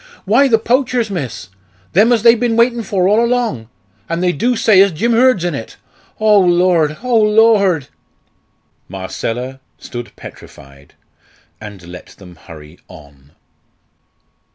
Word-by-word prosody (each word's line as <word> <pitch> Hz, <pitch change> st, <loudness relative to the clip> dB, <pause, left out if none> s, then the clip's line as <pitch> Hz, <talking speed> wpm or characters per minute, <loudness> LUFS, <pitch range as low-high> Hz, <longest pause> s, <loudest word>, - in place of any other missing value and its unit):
"Why 240 Hz, +8 st, +3 dB
the 230 Hz, -4 st, +3 dB
poachers, 245 Hz, -1 st, -1 dB
miss. 130 Hz, -, -6 dB, 0.4 s
Them 215 Hz, +7 st, +3 dB
as 230 Hz, -3 st, +1 dB
they've 235 Hz, -1 st, +5 dB
bin 240 Hz, -2 st, -1 dB
waitin' 235 Hz, +1 st, +1 dB
for 195 Hz, -3 st, -1 dB
all 215 Hz, +4 st, +2 dB
along 235 Hz, -, -2 dB, 0.4 s
and 170 Hz, +2 st, -3 dB
they 180 Hz, -, +2 dB
do 240 Hz, -, -1 dB
say 215 Hz, -4 st, +4 dB
as 200 Hz, 0 st, +3 dB
Jim 220 Hz, +9 st, -2 dB
Hurd's 235 Hz, -5 st, +2 dB
in 175 Hz, -, -2 dB
it. 115 Hz, -5 st, -8 dB, 0.4 s
Oh 215 Hz, -1 st, +4 dB
Lord, 175 Hz, -4 st, +1 dB
oh 240 Hz, -3 st, +1 dB
Lord!" 210 Hz, -8 st, +2 dB, 1.0 s
Marcella 115 Hz, +8 st, -6 dB, 0.2 s
stood 120 Hz, -1 st, -9 dB
petrified, 70 Hz, +1 st, -15 dB, 0.7 s
and 105 Hz, -4 st, -11 dB
let 90 Hz, +1 st, -12 dB
them 90 Hz, -3 st, -15 dB
hurry 80 Hz, 0 st, -15 dB
on. 70 Hz, -5 st, -18 dB
185 Hz, 135 wpm, -15 LUFS, -, 1.0 s, they've